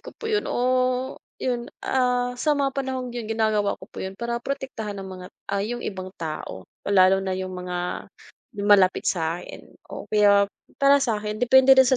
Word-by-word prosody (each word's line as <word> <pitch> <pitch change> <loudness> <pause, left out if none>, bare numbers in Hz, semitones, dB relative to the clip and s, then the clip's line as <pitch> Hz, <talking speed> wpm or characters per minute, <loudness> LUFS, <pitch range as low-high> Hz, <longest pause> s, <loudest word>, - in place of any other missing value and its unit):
ko - - -11
po - - -11
'yun 430 -2 0
o 255 +1 0 0.2
'yun 240 -2 -2 0.2
ah, 250 -1 +1
sa 290 +4 +1
mga 275 -1 +1
panahong 260 -2 -3
'yun 235 -3 -5
ginagawa 215 -2 +1
ko - - -12
po - - -10
'yun 190 0 -5
para 235 +2 -3
protektahan 245 -6 -4
ng 195 - -6
mga 185 -1 -8 0.3
ah, 200 - +1
'yung 235 +4 -3
ibang 185 -2 -5
tao, 155 - -6 0.2
lalo 190 -1 +5
na 190 -1 -2
'yung 185 0 -4
mga 180 -1 -4 0.5
malapit 200 -2 +4
sa 165 -1 -1
akin - - -10 0.3
o - - -6
kaya 205 -1 +6 0.4
para 280 0 +6
sa'kin 215 -4 -1
depende 265 +2 +7
rin 265 - +8
sa 260 - +4
220 Hz, 180 wpm, -24 LUFS, 190-255 Hz, 0.5 s, rin